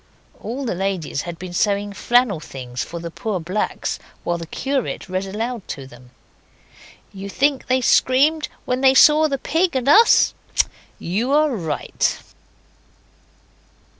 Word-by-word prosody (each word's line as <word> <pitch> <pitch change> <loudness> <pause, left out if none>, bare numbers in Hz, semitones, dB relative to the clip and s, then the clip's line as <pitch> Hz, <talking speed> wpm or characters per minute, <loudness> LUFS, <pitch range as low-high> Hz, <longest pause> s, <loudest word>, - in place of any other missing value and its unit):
All 260 +5 -5
the 235 - -1
ladies 180 -6 -2
had 170 - -6
been 180 0 -8
sewing 205 +2 0
flannel 240 -3 +2
things 125 -4 -6
for 170 - -7
the 170 0 -6
poor 205 +2 -3
blacks 180 +6 -3 0.2
while 175 0 -1
the 165 - -7
curate 265 - -3
read 185 +1 -3
aloud 225 +2 -4
to 135 - -6
them. 125 -1 -15 1.0
You 195 0 -7
think 275 +5 0
they 255 0 +2
screamed 285 +6 +3 0.2
when 250 +1 -1
they 265 0 +5
saw 305 +3 +7
the 275 -2 -2
Pig 335 +4 0
and 260 0 -1
Us? 445 +11 +6 0.6
You 220 +10 -1
are 300 -3 +3
right. 160 -7 -1
210 Hz, 140 wpm, -21 LUFS, 175-265 Hz, 1.0 s, saw